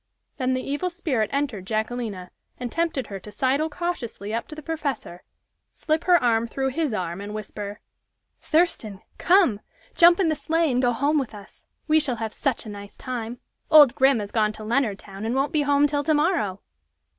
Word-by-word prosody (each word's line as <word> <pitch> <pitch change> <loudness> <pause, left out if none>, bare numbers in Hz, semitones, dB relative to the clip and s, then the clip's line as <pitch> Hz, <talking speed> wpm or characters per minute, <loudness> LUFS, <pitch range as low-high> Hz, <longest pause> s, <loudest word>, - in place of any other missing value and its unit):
Then 255 -2 0
the 255 - -4
evil 290 +6 -1
spirit 285 - -1
entered 260 -10 -2
Jacquelina, 215 -4 -3 0.3
and 245 -2 -4
tempted 330 -6 -1
her 195 -2 -7
to 210 - -11
sidle 275 +7 +1
cautiously 270 -11 -4
up 230 - -2
to 305 - -8
the 310 - -9
professor, 285 - -4 0.5
slip 310 +1 -1
her 360 -1 +6
arm 230 -1 +2
through 265 +3 -1
his 300 +1 -1
arm, 180 -3 -3
and 205 +1 -6
whisper: 210 -1 -6 0.6
"Thurston! 305 - 0 0.2
Come! 350 - +4 0.3
Jump 345 +1 +6
in 375 - +3
the 310 - +1
sleigh 320 +2 +1
and 250 0 +1
go 245 -1 +3
home 285 +6 +1
with 250 -5 -4
us. 205 0 -14 0.2
We 310 0 +5
shall 280 -5 0
have 220 -1 -4
such 270 -6 -2
a - - -7
nice 205 -1 -10
time! 240 -1 -5 0.3
Old 295 -5 +8
Grim 265 -1 +4
has 205 -2 -5
gone 215 -2 +1
to 215 - -10
Leonardtown, 210 -4 -2
and 230 +3 -1
won't 275 +4 0
be 305 - +3
home 285 0 +3
till 290 0 0
to 310 - +3
morrow!" 295 - 0
255 Hz, 190 wpm, -24 LUFS, 215-305 Hz, 0.6 s, Old